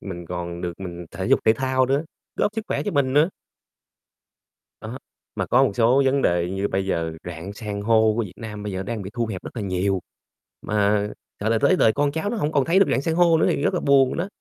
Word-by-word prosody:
mình 85 -3 -7
còn 85 0 -5
được 90 -1 -3
mình 85 -2 -7
thể 95 +2 -4
dục - - +3
thể 110 - +6
thao 130 +2 +1
nữa, 140 +4 0 0.3
góp 210 - 0
sức 220 - -2
khỏe - - -1
cho 205 - -2
mình 140 -5 +1
nữa. 150 +6 +4 1.5
Đó, - - -7 0.4
mà - - -2
có - - +4
một - - 0
số 125 +4 +4
vấn 135 +1 +2
đề 85 0 +1
như 95 +1 -1
bây 95 0 -1
giờ 85 -4 -1
rạn 90 +2 -7
san 105 -1 -5
hô 110 0 +3
của 120 - +1
Việt 100 -5 -7
Nam 105 -2 -7
bây 105 -1 -4
giờ 95 0 -3
đang 110 +1 -4
bị 95 - -7
thu 120 -1 -1
hẹp 100 -4 -6
rất - - -7
là 110 - -3
nhiều, 95 0 0 0.6
mà, 105 0 +1 0.4
gọi 105 +2 -1
là, 115 - +3
tới 185 - +4
đời 110 -10 +4
con 145 +2 +1
cháu 160 +7 -2
nó 235 - -3
hông 150 -6 -1
còn 140 -4 +2
thấy 175 +3 +3
được 195 - +6
rạn - - +1
san 160 +3 -1
hô 170 -1 +4
nữa - - +3
thì - - 0
rất - - +1
là - - 0
buồn 135 -1 +3
đó. 175 - -1
110 Hz, 255 wpm, -23 LUFS, 95-140 Hz, 1.5 s, thể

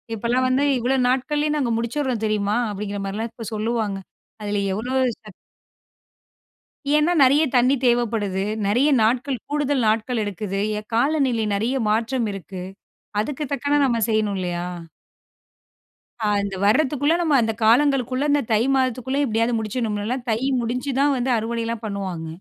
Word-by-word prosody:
இப்போலாம் 240 +4 0
வந்து 260 +2 +2
இவ்வளோ 250 +2 0
நாட்கள்லேயே 295 +4 0
நாங்க 265 -5 0
முடிச்சிர்றோம் 235 -1 -2
தெரியுமா? 210 0 0
அப்டிங்கிற 205 0 -4
மாரிலாம் 215 +4 -3
இப்போ 230 0 -9
சொல்லுவாங்க. 215 -2 -1 0.5
அதில 205 -1 -1
எவ்ளோ 240 +6 -3 0.3
சக் 215 -3 -13 1.6
ஏன்னா, 300 +3 +3
நிறையா 285 +4 +5
தண்ணீ 250 +2 +4
தேவப்படுது. 220 -5 0 0.2
நிறையா 250 +9 +3
நாட்கள், 250 +4 +1
கூடுதல் 290 -3 0
நாட்கள் 225 +2 0
எடுக்குது. 195 0 -4 0.2
எ - - -7
காலநிலை 260 -3 +1
நிறையா 240 +6 0
மாற்றம் 230 +2 0
இருக்கு. 190 -1 -7 0.6
அதுக்கு 290 +5 -4
தக்கன 285 +2 +1
நம்ம 235 -3 +1
செய்யணும் 215 -2 +1
இல்லையா? 175 -1 -3 1.6
அ - - 0 0.2
அந்த 200 -1 -4
வரத்துக்குள்ள 285 +6 +2
நம்ம 310 -4 +2
அந்த 225 -1 0
காலங்கள்குள்ள 260 +3 +3
இந்த 290 0 +3
தை 215 - +3
மாதத்துக்குள்ள 260 +1 0
எப்டியாவது 230 +1 +1
முடிச்சிடணும்ல்ல. 220 +1 -2
தை 220 - 0 0.2
முடிச்சு 250 +4 -2
தான் 285 0 +3
வந்து 250 +1 0
அறுவடைலாம் 230 0 -3
பண்ணுவாங்க. 190 -5 -4
235 Hz, 135 wpm, -22 LUFS, 210-265 Hz, 1.6 s, நிறையா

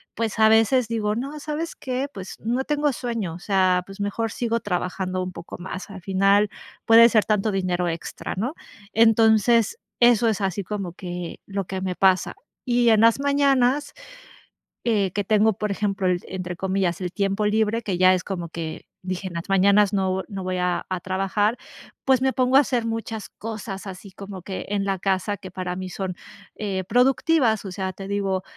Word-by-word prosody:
Pues, 225 -1 -2
a 220 0 +6
veces 225 +2 +4
digo: 215 -2 0
"No, 275 +5 -4
¿sabes 310 +3 -4
qué?, 260 +1 -3
pues, 190 -1 -8
no 240 +4 -1
tengo 295 -1 +1
sueño. 230 -9 -3
O - - -9
sea, 185 -1 +2
pues 195 +1 -12
mejor 215 +3 -1
sigo 230 -1 -1
trabajando 185 0 -2
un 185 - -5
poco 175 - -9
más. 190 +2 -7
Al 190 -1 -9
final, 195 +2 +3 0.4
puede 230 +1 +8
ser 215 -2 +4
tanto 215 0 +1
dinero 180 -2 0
extra", 165 -1 -5
¿no? 250 - -2 0.4
Entonces, 225 - +4 0.2
eso 240 -1 +5
es 215 -2 -1
así 195 0 -1
como 195 -4 -4
que, 175 -2 -6
lo 195 0 -2
que 190 +1 -4
me 185 -1 -2
pasa, 190 -1 +2 0.3
y 240 -1 +3
en 220 -1 +5
las 230 +3 +5
mañanas, 280 0 +2 0.9
eh, 210 -5 +2
que 205 - -1
tengo, 215 0 +3
por 210 0 -3
ejemplo, 195 -1 -1
el 180 -1 +2
entre 180 -1 -5
comillas, 190 -2 -1
"el 180 -1 -3
tiempo 200 +1 0
libre", 220 +2 +1
que 195 -4 -2
ya 185 0 +6
es 185 - -1
como 175 -4 -5
que, 160 -1 -6 0.2
dije: 185 +1 -4
"En 175 - -11
las 170 - -5
mañanas 200 +1 +4
no 190 -1 0
no 195 -3 -6
voy 185 0 -2
a 180 0 -1
a 185 -1 -2
trabajar", 195 +4 0 0.5
pues, 260 -1 +4
me 265 0 +2
pongo 255 0 +3
a - - +8
hacer 245 -4 -1
muchas 225 -2 -4
cosas, 210 -3 -7
así 190 +1 -9
como 195 0 -9
que 190 +2 -6
en 205 -1 0
la 195 -1 -1
casa 195 +1 0
que 190 - -10
para 180 -1 -4
mí 185 0 -5
son, 185 -1 -4 0.4
eh, 195 -3 -3
productivas. 250 -2 +3
O 190 - -5
sea, 190 0 -3
te 195 +1 -8
digo, 195 -2 -1
200 Hz, 190 wpm, -24 LUFS, 185-230 Hz, 0.9 s, puede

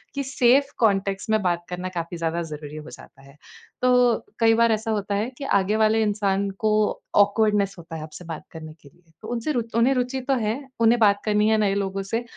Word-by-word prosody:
कि 280 - -1
safe 265 +1 +3
context 200 -2 0
में 215 -1 +2
बात 175 -1 -1
करना 180 +1 -4
काफ़ी 170 +1 -6
ज़्यादा 165 +1 -2
ज़रूरी 150 0 -8
हो 155 +1 -9
जाता 135 - -14
है। 140 +1 -17 0.5
तो 250 -2 +3
कई 225 0 +5
बार 230 0 +3
ऐसा 220 +1 -1
होता 205 -1 -2
है 215 +5 -1
कि 280 - -7
आगे 195 +2 0
वाले 220 0 +3
इंसान 200 -1 0
को 215 - +3 0.5
ऑकवर्डनेस 205 -1 +3
होता 165 -1 -9
है 155 - -6
आपसे 155 +3 -10
बात 165 -2 -7
करने 155 -1 -9
के 140 - -16
लिए। 165 +3 -29
तो 215 - -9
उनसे 240 +5 -2
रु 245 - 0 0.2
उन्हें 250 +4 +4
रुचि 250 +1 -1
तो 270 +2 0
है, 215 -3 -1 0.3
उन्हें 230 +1 +4
बात 205 -2 +4
करनी 210 0 +2
है 220 - +3
नए 200 -2 +1
लोगों 195 -1 -2
से, 225 +5 -3
210 Hz, 220 wpm, -23 LUFS, 180-230 Hz, 0.5 s, कई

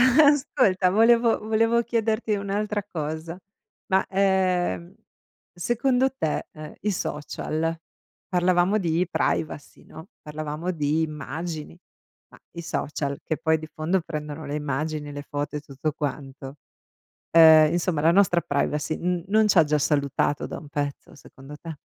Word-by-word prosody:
Ascolta, 260 -8 +4
volevo 230 +3 +4
volevo 225 +2 +2
chiederti 225 -1 0
un'altra 205 +1 -2
cosa, 160 +2 -5 0.5
ma, 190 0 +2
ehm, 185 - +1 0.6
secondo 250 +8 +1
te, 155 - -2
ehm, 155 0 -9
i 210 - 0
social 160 0 -3 0.5
parlavamo 180 +2 +2
di 170 -1 +1
privacy, 150 -2 -2
no, 160 +4 -12
parlavamo 155 +3 -4
di 155 -1 0
immagini, 155 +2 -5 0.5
ma - - -18
i 170 - -7
social, 140 -3 -3
che 160 - -2
poi 160 -1 +1
di 155 - -8
fondo 170 +4 0
prendono 150 -2 -6
le 145 +1 -4
immagini, 150 +1 -3
le 145 0 -6
foto 145 +1 -3
e - - -4
tutto 145 +1 -4
quanto, 140 -2 -5 0.8
ehm, 160 -1 +8
insomma, 170 -3 0
la 165 +2 +5
nostra 180 -2 +4
privacy 150 0 -1
n 175 -1 -1
non 215 +1 +4
c'ha 185 -5 +5
già 150 0 +1
salutato 145 0 0
da - - -6
un 150 - -11
pezzo 145 -1 -4
secondo 135 +2 -13
te? 160 -1 -8
160 Hz, 135 wpm, -25 LUFS, 150-195 Hz, 0.8 s, ehm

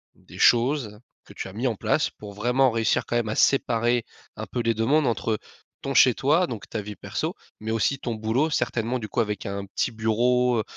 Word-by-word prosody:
des - - -15
choses 120 -3 +3 0.3
que - - -14
tu - - -6
as 95 - -10
mis 120 +6 -1
en 115 - -1
place - - +1
pour 105 -1 -11
vraiment 125 +5 +2
réussir 115 +1 +1
quand - - -3
même 115 -2 -1
à 105 - -2
séparer 120 -3 +2 0.3
un - - -6
peu 120 - -3
les 115 0 +1
2 115 +1 -1
mondes? 150 0 +3
Entre, 110 -1 0 0.5
ton 135 0 -3
chez 125 +2 +7
toi 155 +9 +2
donc 115 - -7
ta 110 - -3
vie 105 0 -7
perso - - -3 0.3
mais 110 +1 -4
aussi 115 +5 +1
ton 120 -3 -4
boulot. 115 +8 0
Certainement 120 -1 -1
du 110 - -7
coup 120 - -2
avec 105 -2 -1
un 100 0 -4
petit 100 - -1
bureau, 120 +2 +1
heu, - - 0
115 Hz, 225 wpm, -25 LUFS, 110-125 Hz, 0.5 s, chez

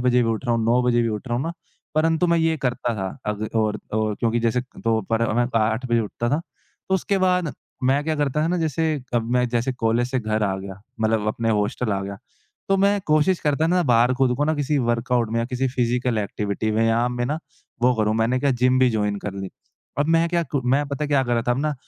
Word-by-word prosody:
बजे 125 0 +3
भी 115 - 0
उठ 110 +3 -3
रहा 120 -2 +1
हूँ, 115 -1 0
9 120 +2 +3
बजे 120 -1 +2
भी 115 - 0
उठ 110 +4 -4
रहा 120 - 0
हूँ 130 - -1
ना, 165 - -3 0.4
परंतु 165 +2 +2
मैं 170 0 +3
ये 160 -1 +2
करता 120 -1 -1
था 95 -1 -2 0.2
अग 105 +1 -3
और 110 -1 +1
और 110 -1 0
क्योंकि 115 0 +1
जैसे 115 +1 +1 0.2
तो 115 -1 +2
पर 115 0 +1
मैं 120 0 +2
तो 115 - +1
8 110 +4 0
बजे 120 -1 +2
उठता 115 +2 -3
था। 150 +3 +1 0.5
तो 190 - +2
उसके 195 +1 0
बाद 180 -5 +1 0.3
मैं 135 +3 +3
क्या 160 -1 0
करता 145 +1 0
था - - +1
ना 180 - +1
जैसे 160 0 0 0.3
अब 115 -1 0
मैं 125 -1 +2
जैसे 120 +2 0
कॉलेज 120 0 0
से 130 - 0
घर 110 -1 -1
आ 95 -2 0
गया, 95 0 -8 0.2
मतलब 110 -1 +1
अपने 115 +1 -1
हॉस्टल 105 +1 0
आ 95 - -1
गया, 100 0 -6 0.5
तो 195 - +3
मैं 200 +1 +3
कोशिश 155 +4 +3
करता 150 +1 +1
हूँ 165 - +2
ना 180 - +3
बाहर 120 -2 +4
खुद 125 -1 +2
को 145 - +1
ना 155 +1 +1
किसी 145 0 0
वर्कआउट 120 -1 0
में 115 - +1
या - - 0
किसी 130 0 -1
फिज़िकल 125 -2 0
एक्टिविटी 105 +1 -2
में 110 +1 +1
या 115 - +3
व्यायाम 120 +2 +1
में 120 - +1
ना 150 +3 -1 0.4
वो 125 0 +4
करूँ, 110 -1 +1
मैंने 115 +3 +1
क्या 140 - +2
जिम 125 0 +2
भी 130 -1 +4
जॉइन 105 -2 0
कर 100 0 -5
लि। 95 -1 -5 0.5
अब 145 - +2
मैं 165 +1 +3
क्या 170 0 +1
कु 140 -2 -2
मैं 145 +1 +2
पता 140 +1 -3
है - - -3
क्या 140 -2 +3
कर 120 - -2
रहा 115 - +1
था - - +2
अब 120 - +1
ना 150 -1 0
125 Hz, 265 wpm, -23 LUFS, 110-145 Hz, 0.5 s, बाहर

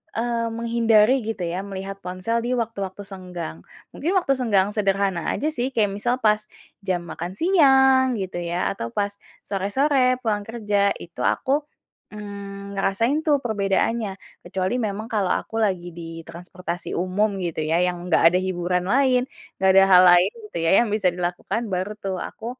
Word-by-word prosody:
eee, 230 0 -1
menghindari 230 +1 +3
gitu 220 -4 -4
ya 175 +2 -3
melihat 195 0 -6
ponsel 185 +6 -1
di 245 - -1
waktu-waktu 205 -4 -4
senggang. 180 - -7 0.3
Mungkin 330 - -2
waktu 275 -6 +2
senggang 205 -5 +2
sederhana 195 -3 0
aja 300 - -2
sih 250 -2 -1
kayak 210 -3 +3
misal 240 +4 +1
pas 215 -1 +2 0.4
jam 185 -2 0
makan 175 +3 -5
siang 265 -7 +5
gitu 185 -2 -4
ya 175 +1 -1
atau 115 - -4
pas 205 0 -1 0.3
sore-sore 255 +6 +1
pulang 210 -4 -1
kerja 205 -3 +1
itu 170 - -9
aku, 265 - 0 0.6
mmm, 200 -1 -8 0.2
ngerasain 230 +9 +1
tuh 295 -2 +4
perbedaannya 210 0 0 0.3
kecuali 185 +2 -2
memang 205 +2 -5
kalau 200 -4 +1
aku - - -10
lagi 180 -3 -2
di 170 - -7 0.2
transportasi 175 +1 -6
umum 185 +5 +1 0.2
gitu 160 -2 -3
ya 165 - +3
yang 180 -1 -1
gak - - +4
ada 180 - +3
hiburan 180 0 -1
lain, 260 -2 +4 0.4
gak 190 - +4
ada 195 - +8
hal 180 - +9
lain 175 +3 +5 0.2
gitu - - -6
ya - - +3
yang 235 - -3
bisa 200 -4 +1
dilakukan 180 +5 -2
baru 185 +3 -1
tuh 195 -1 -2
aku, 225 - -12
200 Hz, 160 wpm, -23 LUFS, 185-230 Hz, 0.6 s, hal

